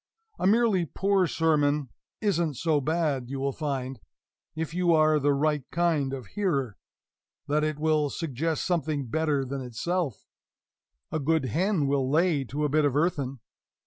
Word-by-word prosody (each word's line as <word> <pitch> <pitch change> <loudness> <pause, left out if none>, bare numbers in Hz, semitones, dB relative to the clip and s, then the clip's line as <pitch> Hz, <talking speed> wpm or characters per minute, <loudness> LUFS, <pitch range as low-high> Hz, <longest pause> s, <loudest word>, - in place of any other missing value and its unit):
A 185 - +2
merely 210 -5 +3
poor 195 +2 +1
sermon 150 -4 +1 0.3
isn't 170 -8 +1
so 155 +2 +1
bad; 150 -4 -1
you 135 0 -4
will 140 +1 0
find, 135 -4 -4 0.6
if 160 0 -3
you 175 -1 +2
are 155 -1 +4
the 145 0 +2
right 150 0 +1
kind 160 -5 +1
of 130 -3 -5
a - - -19
hearer, 140 - -1 0.7
that 150 +1 +1
it 155 -1 -1
will 155 -1 +1
suggest 160 +1 -2
something 155 -5 -1
better 145 +1 0
than 135 +1 -4
itself; 130 - -3 0.9
a 155 - -1
good 155 0 +1
hen 170 - +1
will 135 -1 +1
lay 155 -1 +2
to 145 +6 -2
a - - +3
bit 155 +2 +2
of 140 -2 +1
earthen. 140 -5 0
150 Hz, 160 wpm, -27 LUFS, 135-165 Hz, 0.9 s, are